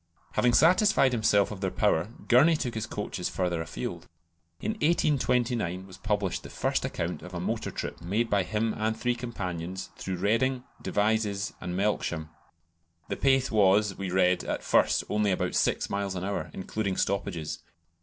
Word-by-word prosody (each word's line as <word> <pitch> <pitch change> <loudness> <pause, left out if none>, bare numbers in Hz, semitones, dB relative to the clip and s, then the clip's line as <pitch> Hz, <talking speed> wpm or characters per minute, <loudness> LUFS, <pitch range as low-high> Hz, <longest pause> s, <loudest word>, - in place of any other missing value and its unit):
Having 125 -1 +2
satisfied 180 -3 +5
himself 110 -4 +3
of 100 -2 -7
their 95 - 0
power, 80 0 +1 0.2
Gurney 145 +7 +6
took 125 -5 -2
his 110 -1 -3
coaches 105 -4 -3
further 90 -3 -1
afield. 80 - -5 0.5
In 220 - -1
1829 125 - +1
was 95 -1 -12
published 105 -4 -1
the - - -10
first - - -1
account - - -3
of - - -9
a - - -2
motor - - -2
trip - - -5
made 105 +7 0
by 100 -3 +2
him 110 +4 -1
and 110 +1 -1
three 125 +2 +1
companions 95 -7 -5
through 95 - -3
Reading, 115 +7 +1 0.2
Devizes, 105 -1 0
and 90 0 -4
Melksham. 85 -6 -1 0.8
The - - -1
pace 135 -1 +2
was, 100 -1 +4
we 95 -1 -4
read, 90 0 +3
at - - -3
first - - +3
only 105 0 +1
about 95 - 0
six - - +1
miles 100 -1 -2
an 90 - -3
hour, 100 +1 -3
including 95 0 -3
stoppages. 95 -5 -2
105 Hz, 165 wpm, -28 LUFS, 95-120 Hz, 0.8 s, Gurney